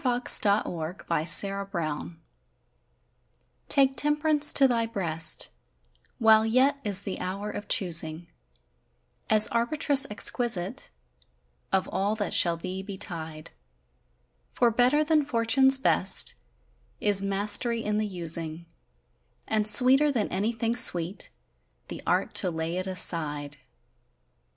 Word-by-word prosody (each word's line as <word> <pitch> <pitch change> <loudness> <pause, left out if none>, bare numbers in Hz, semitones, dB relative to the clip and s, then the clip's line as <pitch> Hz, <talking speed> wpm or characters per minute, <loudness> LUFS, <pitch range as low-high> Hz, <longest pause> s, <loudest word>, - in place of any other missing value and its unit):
A 245 -2 -1
Talisman 175 -2 -1 1.5
TAKE 270 -2 +2
Temperance 295 0 +1
to 275 - +5
thy 230 -2 -2
breast, 165 -7 -1 0.7
While 220 -1 +3
yet 255 +5 0
is 200 -3 -1
the 200 -1 -7
hour 200 +3 -6
of 205 - -9
choosing, 170 -2 -1 1.0
As 215 -1 +8
arbitress 275 +4 0
exquisite 210 -3 -1 0.8
Of 190 -1 -1
all 195 +4 -2
that 205 -2 -5
shall 170 -1 +2
thee 185 +3 -7
betide; 170 -6 -7 1.0
For 240 -1 0
better 250 +6 +1
than 305 -1 0
fortune's 265 +2 +2
best 265 - +4 0.7
Is 205 -2 +3
mastery 205 +4 +1
in 210 0 -3
the 215 - -3
using, 170 -3 -5 0.8
And 215 -1 -2
sweeter 265 +7 +5
than 230 -6 -3
anything 225 +4 -3
sweet 180 -6 +2 0.6
The - - -8
art - - -2
to 185 - +5
lay 165 +1 -5
it 185 +1 -5
aside! 150 -6 -3
205 Hz, 105 wpm, -25 LUFS, 175-240 Hz, 1.5 s, As